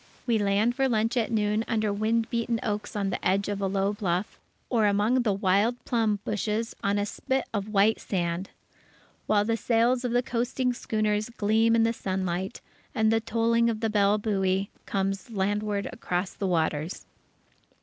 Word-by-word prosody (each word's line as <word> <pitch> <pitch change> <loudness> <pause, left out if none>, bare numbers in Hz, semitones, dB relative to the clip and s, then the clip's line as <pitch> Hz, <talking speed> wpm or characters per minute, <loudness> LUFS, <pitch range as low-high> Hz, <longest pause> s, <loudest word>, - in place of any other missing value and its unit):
We 230 -3 +2
land 205 +3 +2
for 270 0 +1
lunch 225 0 +1
at 235 -1 0
noon 210 0 +1
under 215 -3 0
wind 225 +2 +1
beaten 235 -1 0
oaks 210 -3 -3
on 200 -2 -1
the - - -4
edge 195 +2 +1
of 200 -1 -3
a 195 - +1
low 195 +1 0
bluff, 185 -1 -2 0.3
or 225 -4 +2
among 210 +5 +2
the 225 -4 +1
wild 200 +4 +2
plum 225 -3 +1
bushes 215 +2 -2
on 200 0 +1
a 205 - +1
spit 265 +5 -2
of 205 -1 -2
white 210 +1 +3
sand; 175 0 -2 0.8
while 205 -1 +3
the 230 +1 +1
sails 240 +2 +2
of 245 - -1
the 245 +1 +2
coasting 250 0 -1
schooners 215 -2 -1
gleam 225 0 +2
in 225 - +4
the 230 0 +2
sunlight, 185 -2 -3 0.3
and 220 0 +3
the 225 - +2
tolling 230 +1 +2
of 220 -2 -2
the 225 -1 -1
bell 205 0 +3
buoy 195 -2 0 0.2
comes 195 +2 -2
landward 205 0 -1
across 180 +1 -2
the 195 - -3
waters.... 160 -1 -1
210 Hz, 175 wpm, -27 LUFS, 200-230 Hz, 0.8 s, in